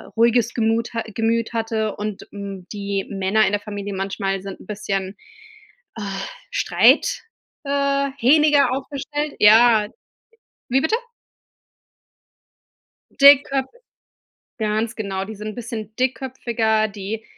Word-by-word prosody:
ruhiges 235 0 +3
Gemut 230 0 0
ha 230 - -2
Gemüt 230 +1 0
hatte, 225 -2 -2
und, 210 -1 -5
hm, 200 -2 -8
die 200 -1 -3
Männer 200 +2 +1
in - - 0
der 205 - 0
Familie 205 -1 -6
manchmal 195 0 -2
sind 195 -1 -8
'n - - -15
bisschen, 195 -2 -3 0.8
äh, - - -5 0.5
streit, - - +3 0.4
äh, 280 0 0
hähniger 290 0 +4
aufgestellt. 290 +2 -4
Ja. 220 0 +6 0.8
Wie 265 +2 +2
bitte? 380 +8 +2 2.2
Dickköp 275 -1 +6 0.9
Ganz 220 +1 -1
genau, 195 -3 -3
die 220 +2 -8
sind 210 +1 -7
'n 215 - -6
bisschen 225 -2 -6
dickköpfiger, 240 -4 0
die 210 +2 -6
220 Hz, 115 wpm, -21 LUFS, 205-255 Hz, 2.2 s, Ja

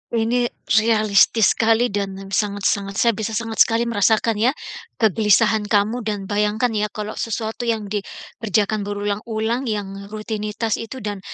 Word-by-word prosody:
Ini, 240 +2 +1 0.4
realistis 215 0 +4
sekali 225 +1 +2
dan 200 -1 -2 0.2
sangat-sangat, 200 -1 0
saya 235 +2 +3
bisa 220 +1 -4
sangat 225 -1 -3
sekali 230 0 +4
merasakan 220 -1 +1
ya, 250 +6 +2 0.4
kegelisahan 215 0 +3
kamu 210 +3 +1
dan 210 -3 -3
bayangkan 210 +4 0
ya 210 -1 0
kalau 210 0 -6
sesuatu 225 +1 -4
yang 215 -3 -2
dikerjakan 210 0 -2
berulang-ulang 220 +4 -2
yang, 200 -2 -4
rutinitas 215 +1 -3
itu 230 +2 -7
dan, 205 -1 -4
215 Hz, 130 wpm, -21 LUFS, 205-225 Hz, 0.4 s, realistis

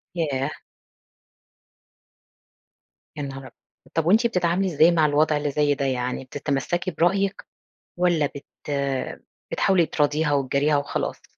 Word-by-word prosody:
ياه! 145 -4 -1 2.7
يا 145 - -3
نهار 135 -1 -6
أبيض! 130 - -12 0.4
طَب 165 -1 0
وأنتِ 220 +7 +4
بتتعاملي 180 -2 +1
إزاي 160 +3 +6
مع 160 -3 +3
الوضع 150 +1 +2
اللي 145 0 -2
زي 145 0 +2
ده؟ 140 0 -2
يعني 125 0 -2
بتتمسكي 145 +7 -2
برأيِك؟ 195 +4 0 0.5
والّا 175 -4 +2
بت 140 0 -9 0.2
آآ 140 -2 -2 0.3
بتحاولي 180 -4 +3
تراضيها 150 0 +1
وتجاريها 140 +2 +2
وخلاص؟ 140 0 -3
150 Hz, 120 wpm, -24 LUFS, 140-170 Hz, 2.7 s, إزاي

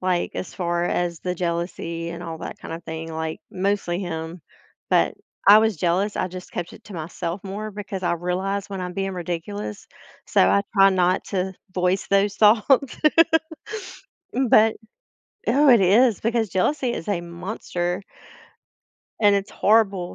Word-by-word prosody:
like, 180 -1 0
as 185 - -5
far 175 -1 -1
as 175 -2 -1
the 180 0 -2
jealousy 170 -1 -3
and 170 +1 -7
all 165 -2 -6
that - - -7
kind - - -7
of 165 - -7
thing, 160 0 -6
like, 160 0 -4
mostly 190 -2 -1
him, 165 -2 -5 0.5
but - - +3 0.3
I 210 +1 +10
was 220 -4 +2
jealous, 185 +5 0
I 185 - -1
just 185 +1 -10
kept 175 -1 -4
it - - -14
to 205 -3 -11
myself 170 +2 -5
more 205 +2 -5
because 200 -2 -6
I - - +2
realize 185 +4 -2
when 195 -1 -4
I'm 180 0 -4
being 195 +1 -2
ridiculous, 160 - -5 0.4
so, - - +3
I 100 +1 +3
try 195 0 +7
not 185 0 +2
to 190 -1 -2 0.2
voice 180 +1 +1
those 200 +1 +2
thoughts. 230 +5 +4 1.4
M 260 -2 +1
but 220 +1 +5 0.7
Oh, 275 +4 +5
it 235 -4 +7
is 215 +4 +4
because 225 -2 0
jealousy 250 - 0
is 165 - -6
a 175 -4 0
monster. 175 0 -4 1.2
And 205 -1 +5
it's 200 0 -1
horrible 200 -4 +2
185 Hz, 160 wpm, -23 LUFS, 170-205 Hz, 1.4 s, I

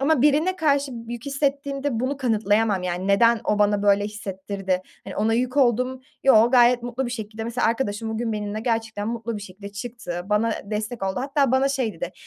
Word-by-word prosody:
Ama 280 -1 +3
birine 310 +6 +3
karşı 285 -4 +1
b 230 0 -7
yük 240 +3 -7
hissettiğimde 280 -2 -1
bunu 265 +3 -1
kanıtlayamam. 215 -5 +1
Yani, 180 +2 -2
neden 230 +3 +4
o 210 - +1
bana 205 -1 +2
böyle 205 0 +4
hissettirdi, 195 -2 -3 0.2
hani, - - -8
ona 220 +2 +2
yük 250 +3 -1
oldum, 255 0 +2 0.2
yoo 235 -3 +6
gayet 245 -1 +5
mutlu 245 +2 -3
bir - - -4
şekilde. 220 -2 -5
Mesela 235 +1 0
arkadaşım 225 -2 -1
bugün 225 +1 -2
benimle 210 0 -3
gerçekten 225 -2 -2
mutlu 230 -1 -3
bir 205 - -7
şekilde 200 +1 -9
çıktı, 205 -5 -6
bana 215 +3 +1
destek 215 +1 -4
oldu. 190 +5 -1
Hatta 275 -1 +1
bana 265 +1 +3
şey 260 -6 -1
dedi, 170 +2 -5
230 Hz, 190 wpm, -24 LUFS, 205-255 Hz, 0.2 s, yoo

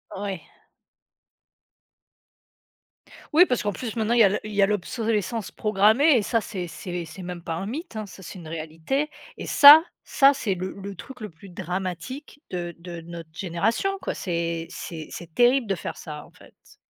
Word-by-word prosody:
Ouais. 195 -3 -4 2.9
Oui, 350 +4 +8
parce 250 - 0
qu'en 205 -1 -1
plus, 230 +3 -5
maintenant, 225 +1 +1
il 240 - +3
y 225 - +9
a - - +7
l 195 - 0
il 215 -1 -7
y 205 - +2
a 195 - +7
l'obsolescence 210 0 -1
programmée 220 +8 +4
et - - +2
ça 230 +3 +1
c'est 185 -4 -5
c'est 175 +1 -5
c'est 185 +3 -10
même 175 -1 -6
pas 165 - -3
un 190 - -4
mythe, 280 - -6
hein, 215 - -3
ça, 190 -1 -12
c'est 185 +1 -9
une 165 - -10
réalité 165 - -2 0.3
et - - -6
ça, 295 +3 +10 0.2
ça 275 +1 +5
,c'est 220 -8 -1
le 185 +1 -4
le 200 0 -7
truc 265 +9 -11
le 210 - -5
plus 180 +4 -15
dramatique 185 - -5
de 175 -1 -4
de 170 -1 -8
notre 165 -1 -9
génération, 200 - -1
quoi, - - -2
c'est 170 -2 -2
c'est 160 -3 -7
c'est 170 -2 -9
terrible 245 +3 +4
de 195 - 0
faire 170 - -6
ça, 150 -2 -8
en - - -19
fait. - - -20
195 Hz, 190 wpm, -25 LUFS, 170-230 Hz, 2.9 s, ça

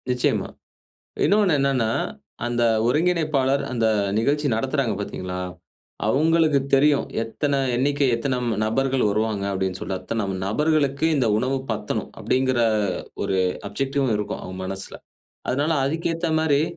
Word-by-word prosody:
நிச்சியமா. 125 -1 +1 0.8
இன்னொன்னு 200 -4 +4
என்னன்னா, 135 -5 +1 0.6
அந்த 120 0 0 0.2
ஒருங்கிணைப்பாளர் 150 -2 +2
அந்த 115 -3 0 0.3
நிகழ்ச்சி 145 +6 +1
நடத்துறாங்க 130 0 0
பார்த்தீங்களா, 90 -2 -4 0.7
அவங்களுக்கு 155 +3 +3
தெரியும். 140 +1 +4 0.2
எத்தனை 140 +5 -1 0.2
எண்ணிக்கை, 140 +2 +2
எத்தனை 125 +2 -1 0.3
நபர்கள் 135 +4 +1
வருவாங்க 105 -1 0
அப்டின்னு 95 -1 -2
சொல்லிட்டு. 95 -1 -4
அத்தன 110 0 -2 0.2
நபர்களுக்கு 145 +5 +1
இந்த 130 -5 +2
உணவு 130 +4 0
பத்தணும். 105 -1 -3
அப்டிங்குற 130 -1 +1 0.6
ஒரு 95 - 0 0.3
ஆப்ஜெக்டிவ்வும் 135 +1 0
இருக்கும், 105 - -4
அவங்க 95 0 -7
மனசில. 95 +1 -6 0.5
அதுனால 145 +5 +1
அதுக்கேத்த 165 +3 -1
மாரி 150 -2 +3
135 Hz, 115 wpm, -23 LUFS, 110-145 Hz, 0.8 s, இன்னொன்னு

